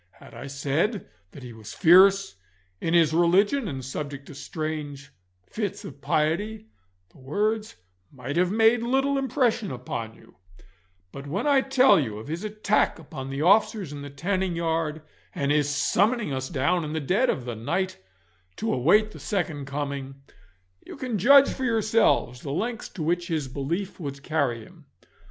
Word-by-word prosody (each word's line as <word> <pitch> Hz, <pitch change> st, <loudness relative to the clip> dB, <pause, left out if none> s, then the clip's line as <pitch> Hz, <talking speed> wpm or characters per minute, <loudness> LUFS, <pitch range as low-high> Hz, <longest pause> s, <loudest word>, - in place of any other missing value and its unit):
Had -, -, -16 dB
I -, -, -8 dB
said 145 Hz, -, -1 dB, 0.2 s
that 135 Hz, -, -12 dB
he 120 Hz, -2 st, -9 dB
was 110 Hz, -1 st, -10 dB
fierce 195 Hz, +3 st, +5 dB, 0.4 s
in 165 Hz, +1 st, 0 dB
ins 160 Hz, -2 st, +4 dB
religion 195 Hz, -, +3 dB
and 135 Hz, -6 st, -5 dB
subject 140 Hz, +1 st, -6 dB
to -, -, -11 dB
strange 145 Hz, -2 st, -6 dB, 0.3 s
fits 210 Hz, -3 st, -4 dB
of 140 Hz, -1 st, -10 dB
piety, 205 Hz, +11 st, -1 dB, 0.4 s
the -, -, -21 dB
words 210 Hz, +11 st, -2 dB, 0.4 s
might 140 Hz, +1 st, -6 dB
have 180 Hz, +1 st, +2 dB
made 225 Hz, +2 st, +4 dB
little 270 Hz, +3 st, +1 dB
impression 250 Hz, -5 st, 0 dB
upon 115 Hz, -3 st, -5 dB
you; -, -, -20 dB, 0.7 s
but 140 Hz, +1 st, -9 dB
when 195 Hz, -, -2 dB
I 280 Hz, -2 st, +4 dB
tell 265 Hz, -5 st, +5 dB
you 110 Hz, -8 st, -3 dB
of 110 Hz, +6 st, -9 dB
his 165 Hz, +5 st, -4 dB
attack 215 Hz, 0 st, 0 dB
upon 135 Hz, -4 st, -8 dB
the 135 Hz, +2 st, -3 dB
officers 200 Hz, -3 st, +3 dB
in 145 Hz, -, -7 dB
the 145 Hz, -, -7 dB
tanning 185 Hz, +5 st, -2 dB
yard, 160 Hz, -2 st, -2 dB, 0.3 s
and 140 Hz, -4 st, 0 dB
his 145 Hz, -1 st, +2 dB
summoning 205 Hz, -, +1 dB
us 130 Hz, 0 st, -3 dB
down 160 Hz, +4 st, 0 dB
in 150 Hz, 0 st, -5 dB
the 160 Hz, -, -1 dB
dead 190 Hz, -, +1 dB
of 125 Hz, -, -1 dB
the 120 Hz, -, -4 dB
night 185 Hz, -, -2 dB, 0.6 s
to 225 Hz, -, -2 dB
await 210 Hz, -, +3 dB
the -, -, -11 dB
second 170 Hz, -8 st, -3 dB
coming, 140 Hz, -1 st, -4 dB, 0.7 s
you -, -, -10 dB
can 250 Hz, -6 st, -3 dB
judge 275 Hz, +7 st, +7 dB
for 265 Hz, -, -6 dB
yourselves 220 Hz, -, +2 dB
the 140 Hz, -, -7 dB
lengths 220 Hz, -, -3 dB
to 170 Hz, -, -6 dB
which 170 Hz, +2 st, 0 dB
his 155 Hz, -5 st, -2 dB
belief 165 Hz, +10 st, -4 dB
would 140 Hz, -3 st, -6 dB
carry 140 Hz, -8 st, -1 dB
him. -, -, -18 dB
165 Hz, 170 wpm, -25 LUFS, 140-210 Hz, 0.7 s, judge